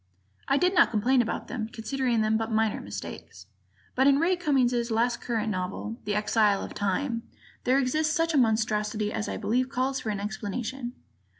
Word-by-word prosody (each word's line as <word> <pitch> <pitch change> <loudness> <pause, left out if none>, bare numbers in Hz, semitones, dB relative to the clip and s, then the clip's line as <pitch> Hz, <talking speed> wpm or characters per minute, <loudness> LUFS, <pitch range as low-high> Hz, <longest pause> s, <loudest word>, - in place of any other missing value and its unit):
I 275 - +3
did 360 +4 +2
not 350 - +5
complain 245 +4 +3
about 230 - -3
them, 225 -3 -4
considering 245 0 -1
them 215 0 +2
but 225 +1 -1
minor 220 -1 +1
mistakes. 100 -2 -8 0.5
But 265 +2 +3
in 280 -1 +6
Ray 340 +5 +3
Cummings' 250 -8 +1
latest 235 +2 +1
current 225 -2 -1
novel, 185 +4 -4
"The 205 0 -1
Exile 210 -1 +2
of - - -7
Time," 230 +5 -1 0.4
there 255 +2 +4
exists 305 +4 +1
such 330 0 +1
a - - +3
monstrosity 215 -2 +1
as 215 - -2
I - - -3
believe 240 +5 0
calls 265 +1 -1
for 220 - -4
an 205 -2 -2
explanation. 220 +4 -4
230 Hz, 180 wpm, -27 LUFS, 215-265 Hz, 0.5 s, in